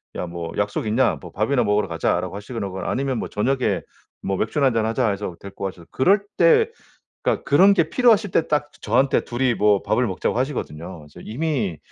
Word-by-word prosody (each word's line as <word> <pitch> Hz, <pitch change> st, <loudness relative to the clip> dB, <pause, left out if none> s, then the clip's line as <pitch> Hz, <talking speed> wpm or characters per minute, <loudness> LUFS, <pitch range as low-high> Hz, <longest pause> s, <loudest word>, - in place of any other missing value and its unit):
"야 90 Hz, -, -3 dB
뭐 85 Hz, -1 st, -6 dB
약속 105 Hz, +2 st, -1 dB
있냐 120 Hz, +4 st, +2 dB
뭐 90 Hz, -3 st, -10 dB
밥이나 120 Hz, +4 st, +1 dB
먹으러 105 Hz, 0 st, +1 dB
가자."라고 85 Hz, +2 st, -1 dB
하시거나 105 Hz, -2 st, -5 dB, 0.2 s
아니면 130 Hz, -1 st, -1 dB
뭐 -, -, -3 dB
"저녁에 130 Hz, +5 st, 0 dB, 0.4 s
뭐 95 Hz, -1 st, -2 dB
맥주나 135 Hz, +5 st, +1 dB
1잔 115 Hz, -3 st, +1 dB
하자." 115 Hz, +1 st, +1 dB
해서 100 Hz, -3 st, -4 dB
데리고 100 Hz, 0 st, -7 dB
가셔서 90 Hz, -3 st, -7 dB
그럴 195 Hz, +9 st, +3 dB
때 455 Hz, -2 st, +5 dB, 0.5 s
그러니까 -, -, 0 dB
그런 185 Hz, +9 st, +5 dB
게 165 Hz, -4 st, +2 dB
필요하실 225 Hz, -5 st, +3 dB
때 165 Hz, -, +1 dB
딱 150 Hz, -1 st, 0 dB
저한테 130 Hz, +5 st, +2 dB
둘이 125 Hz, 0 st, 0 dB
뭐 105 Hz, -2 st, +3 dB
밥을 125 Hz, 0 st, +1 dB
먹자고 95 Hz, +2 st, -2 dB
하시거든요. 95 Hz, -, -4 dB
그래서 85 Hz, -, -14 dB
이미 125 Hz, -, -2 dB
115 Hz, 405 characters per minute, -22 LUFS, 100-140 Hz, 0.5 s, 때